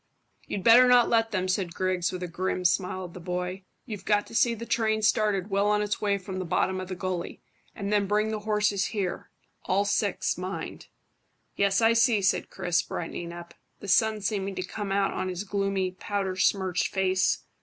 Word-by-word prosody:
"You'd 195 Hz, -, -4 dB
better 240 Hz, +2 st, +8 dB
not 245 Hz, -1 st, +5 dB
let 225 Hz, -1 st, +3 dB
them," 185 Hz, -3 st, -1 dB
said 185 Hz, -2 st, -1 dB
Griggs, 185 Hz, -1 st, 0 dB
with 185 Hz, -1 st, -5 dB
a -, -, -3 dB
grim 180 Hz, +1 st, -3 dB
smile 185 Hz, +1 st, +1 dB
at 175 Hz, -, -11 dB
the 180 Hz, -, -9 dB
boy. 180 Hz, +2 st, -4 dB, 0.2 s
"You've 210 Hz, -6 st, -7 dB
got 205 Hz, 0 st, +2 dB
to -, -, -14 dB
see 235 Hz, +1 st, +3 dB
the 230 Hz, +1 st, -7 dB
train 220 Hz, -2 st, 0 dB
started 210 Hz, -2 st, +1 dB
well 200 Hz, +1 st, +2 dB
on 210 Hz, 0 st, +2 dB
its 205 Hz, -1 st, -2 dB
way 200 Hz, -1 st, +1 dB
from 190 Hz, -1 st, -6 dB
the -, -, -2 dB
bottom 185 Hz, +1 st, 0 dB
of 185 Hz, -, -6 dB
the 185 Hz, -, -5 dB
gully, 180 Hz, -1 st, -4 dB, 0.3 s
and 200 Hz, 0 st, -3 dB
then 205 Hz, -1 st, +2 dB
bring 210 Hz, +2 st, +1 dB
the 215 Hz, -, -2 dB
horses 210 Hz, -2 st, +1 dB
here 200 Hz, -5 st, -3 dB, 0.4 s
all 200 Hz, +2 st, +1 dB
six, 200 Hz, -2 st, 0 dB
mind." 185 Hz, +1 st, -6 dB, 0.7 s
"Yes, 200 Hz, +1 st, +2 dB
I 225 Hz, 0 st, +5 dB
see," 230 Hz, -3 st, +3 dB
said 190 Hz, -, +1 dB
Chris, 175 Hz, -3 st, 0 dB
brightening 170 Hz, 0 st, -5 dB
up, 170 Hz, 0 st, -10 dB, 0.3 s
the -, -, -9 dB
sun 215 Hz, +2 st, +3 dB
seeming 195 Hz, -1 st, -2 dB
to 185 Hz, -, -3 dB
come 200 Hz, +2 st, -5 dB
out 195 Hz, 0 st, +1 dB
on 185 Hz, -, -2 dB
his 180 Hz, +1 st, -4 dB
gloomy, 195 Hz, -2 st, -1 dB
powder 190 Hz, 0 st, -3 dB
smirched 185 Hz, -1 st, +1 dB
face. 190 Hz, -1 st, +1 dB
195 Hz, 200 wpm, -27 LUFS, 185-210 Hz, 0.7 s, better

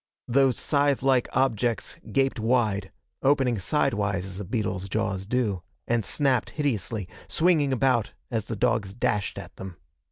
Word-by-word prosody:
Those 130 Hz, 0 st, +3 dB
scythe 140 Hz, -2 st, +1 dB
like 130 Hz, -2 st, +3 dB
objects 120 Hz, 0 st, 0 dB
gaped 135 Hz, -2 st, +1 dB
wide 110 Hz, -4 st, +1 dB, 0.3 s
opening 135 Hz, -5 st, +3 dB
sidewise 100 Hz, -, 0 dB
as 95 Hz, 0 st, -7 dB
a -, -, -3 dB
beetle's 95 Hz, -2 st, -2 dB
jaws 95 Hz, -2 st, -1 dB
do 110 Hz, -6 st, 0 dB, 0.3 s
and 120 Hz, -1 st, +1 dB
snapped 130 Hz, +4 st, +1 dB
hideously, 115 Hz, -, -2 dB, 0.2 s
swinging 160 Hz, -5 st, +3 dB
about 130 Hz, -4 st, +2 dB, 0.2 s
as 110 Hz, -3 st, -1 dB
the 115 Hz, -, -4 dB
dogs 110 Hz, -3 st, 0 dB
dashed 105 Hz, -4 st, -1 dB
at -, -, -9 dB
them. 95 Hz, -2 st, -8 dB
115 Hz, 140 wpm, -26 LUFS, 100-135 Hz, 0.3 s, Those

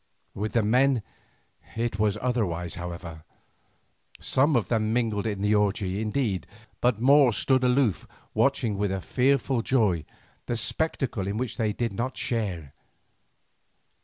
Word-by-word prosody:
With 105 Hz, +1 st, -4 dB
the 115 Hz, -, +2 dB
men 125 Hz, +2 st, +3 dB, 0.7 s
it 115 Hz, -2 st, -2 dB
was 105 Hz, -1 st, +2 dB
otherwise, 90 Hz, -9 st, -1 dB
however. 85 Hz, -2 st, -7 dB, 1.0 s
Some 140 Hz, +3 st, +2 dB
of 110 Hz, -6 st, +1 dB
them 110 Hz, -2 st, 0 dB
mingled 115 Hz, -3 st, 0 dB
in 100 Hz, -2 st, -3 dB
the 105 Hz, +1 st, +3 dB
orgie 100 Hz, -1 st, 0 dB
indeed, 110 Hz, -4 st, -1 dB, 0.3 s
but 120 Hz, -3 st, +1 dB
more 135 Hz, +1 st, +6 dB
stood 130 Hz, +5 st, +2 dB
aloof 125 Hz, -, +2 dB, 0.3 s
watching 120 Hz, -7 st, +1 dB
with 100 Hz, -1 st, 0 dB
a 95 Hz, -, -1 dB
fearful 130 Hz, -, +1 dB
joy 105 Hz, -, +1 dB, 0.4 s
the 120 Hz, -, -1 dB
spectacle 115 Hz, -3 st, -1 dB
in 100 Hz, +2 st, -2 dB
which 125 Hz, 0 st, -3 dB
they 110 Hz, -3 st, +1 dB
did 115 Hz, 0 st, -2 dB
not 120 Hz, +5 st, -3 dB
share. 90 Hz, -, -2 dB
110 Hz, 135 wpm, -26 LUFS, 100-125 Hz, 1.0 s, more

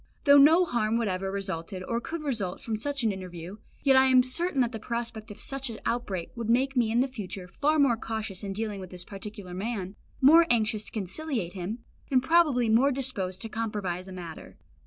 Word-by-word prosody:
Though 285 Hz, -1 st, +8 dB
no 320 Hz, +6 st, +7 dB
harm 230 Hz, -6 st, 0 dB
whatever 195 Hz, -4 st, -1 dB
resulted 190 Hz, -1 st, -4 dB
or 235 Hz, +4 st, -2 dB
could 320 Hz, +5 st, -5 dB
result 220 Hz, -11 st, -2 dB
from 225 Hz, -, -3 dB
such 280 Hz, +4 st, -2 dB
an 220 Hz, -, +3 dB
interview, 185 Hz, 0 st, -7 dB, 0.3 s
yet 275 Hz, -2 st, +5 dB
I 265 Hz, 0 st, +7 dB
am 255 Hz, -1 st, +6 dB
certain 300 Hz, +4 st, -2 dB
that 240 Hz, -1 st, +1 dB
the 225 Hz, -, -5 dB
prospect 235 Hz, -1 st, -4 dB
of 210 Hz, -, -9 dB
such 270 Hz, -1 st, -3 dB
an 225 Hz, -, -7 dB
outbreak 200 Hz, -8 st, -2 dB
would 230 Hz, -2 st, -4 dB
make 265 Hz, +3 st, +2 dB
me 240 Hz, -3 st, +3 dB
in 235 Hz, +2 st, +3 dB
the 265 Hz, -, +2 dB
future 195 Hz, -7 st, -6 dB
far 295 Hz, +11 st, +1 dB
more 275 Hz, -6 st, +4 dB
cautious 220 Hz, -4 st, -4 dB
in 200 Hz, -, -3 dB
dealing 210 Hz, -1 st, -3 dB
with 185 Hz, -1 st, -8 dB
this 180 Hz, -1 st, -6 dB
particular 200 Hz, -2 st, -8 dB
man, 195 Hz, 0 st, -4 dB, 0.2 s
more 325 Hz, +5 st, +7 dB
anxious 215 Hz, -2 st, +2 dB
to -, -, -11 dB
conciliate 215 Hz, -, -3 dB
him, 200 Hz, +5 st, -5 dB, 0.3 s
and 255 Hz, -2 st, +3 dB
probably 290 Hz, -6 st, +4 dB
more 240 Hz, +6 st, +4 dB
disposed 200 Hz, -9 st, -2 dB
to 225 Hz, -, -5 dB
compromise 210 Hz, -5 st, -3 dB
a -, -, -9 dB
matter. 175 Hz, -3 st, -9 dB
225 Hz, 205 wpm, -28 LUFS, 195-260 Hz, 0.3 s, Though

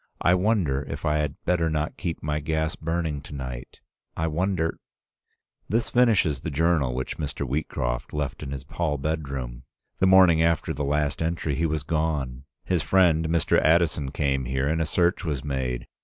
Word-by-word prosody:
I 85 Hz, -, +4 dB
wonder 90 Hz, -8 st, +2 dB
if 70 Hz, +3 st, -5 dB
I 75 Hz, 0 st, +2 dB
had 75 Hz, -2 st, -1 dB
better 85 Hz, -2 st, +2 dB
not 75 Hz, 0 st, -2 dB
keep 85 Hz, -4 st, -4 dB
my 75 Hz, 0 st, -1 dB
gas 80 Hz, +3 st, -1 dB
burning 80 Hz, -3 st, -2 dB
to 75 Hz, -, -10 dB
night? 65 Hz, -2 st, -7 dB, 0.4 s
I 80 Hz, -, 0 dB
wonder 80 Hz, +1 st, -1 dB, 0.5 s
—" -, -, -48 dB
This 115 Hz, +2 st, 0 dB
finishes 110 Hz, -, +3 dB
the -, -, -3 dB
journal 75 Hz, -4 st, +1 dB
which 65 Hz, -, -4 dB
Mr. 70 Hz, -2 st, -3 dB
Wheatcroft -, -, -2 dB
left 75 Hz, -4 st, -3 dB
in -, -, -5 dB
his 70 Hz, 0 st, -6 dB
hall 75 Hz, -3 st, -1 dB
bedroom. 70 Hz, -5 st, -3 dB, 0.4 s
The 95 Hz, -, +4 dB
morning 95 Hz, -4 st, +6 dB
after 80 Hz, -1 st, +1 dB
the 75 Hz, 0 st, -3 dB
last 75 Hz, +1 st, 0 dB
entry 80 Hz, -2 st, -1 dB
he 80 Hz, +4 st, +1 dB
was 80 Hz, -1 st, -2 dB
gone. 75 Hz, -5 st, -2 dB, 0.2 s
His 90 Hz, -3 st, 0 dB
friend, 80 Hz, -2 st, +3 dB
Mr. 85 Hz, -1 st, +3 dB
Addison, 80 Hz, -3 st, +2 dB
came 70 Hz, -2 st, 0 dB
here, 65 Hz, +2 st, -1 dB
and 80 Hz, +2 st, +1 dB
a -, -, +1 dB
search 85 Hz, +4 st, +1 dB
was 75 Hz, -6 st, -2 dB
made. 65 Hz, -4 st, -2 dB
75 Hz, 180 wpm, -25 LUFS, 70-85 Hz, 0.5 s, morning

